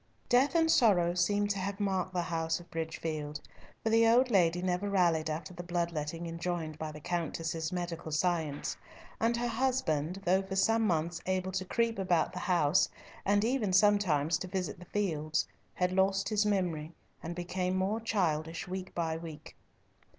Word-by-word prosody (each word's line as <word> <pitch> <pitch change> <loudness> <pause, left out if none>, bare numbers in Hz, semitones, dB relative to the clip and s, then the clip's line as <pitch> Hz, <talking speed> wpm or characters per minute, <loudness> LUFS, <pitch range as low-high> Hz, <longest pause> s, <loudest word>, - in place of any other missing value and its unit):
Death 265 +6 +4
and 325 -1 +4
sorrow 180 - +4
seemed 205 +3 +1
to 200 - -1
have 195 +2 -3
marked 190 -2 0
the 180 -1 -1
house 165 -1 -1
of 175 - -15
Bridgefield, 160 -2 -4 0.4
for 225 - +1
the 225 0 +5
old 245 +2 +4
lady 180 -3 +3
never 185 +2 0
rallied 170 -5 +2
after 155 +3 -4
the 175 - -6
blood 175 -1 -1
letting 160 +2 -4
enjoined 165 -2 -3
by 155 -1 -4
the 150 - -9
Countess's 165 -1 -2
medical 175 -3 -4
science, 155 -2 0 0.4
and 230 +1 +2
her 240 0 -1
husband, 220 - 0
though 185 +2 +4
for 190 0 -5
some 225 +3 +3
months 170 -1 0
able 185 0 0
to 190 0 -2
creep 230 +2 0
about 180 -4 +1
the - - -4
house, 175 -1 +3 0.4
and 205 +2 +3
even 235 -5 +1
sometimes 185 -6 +3
to 185 - -5
visit 180 -4 -3
the 180 - -11
fields, 155 -7 -1 0.3
had 180 0 +1
lost 195 +1 +2
his 210 -1 +2
memory, 170 -6 -1 0.3
and 170 - -5
became 180 +1 -2
more 195 +4 0
childish 165 -8 -1
week 185 0 -6
by 165 -2 -1
week. 160 -2 -9
180 Hz, 170 wpm, -31 LUFS, 165-200 Hz, 0.4 s, the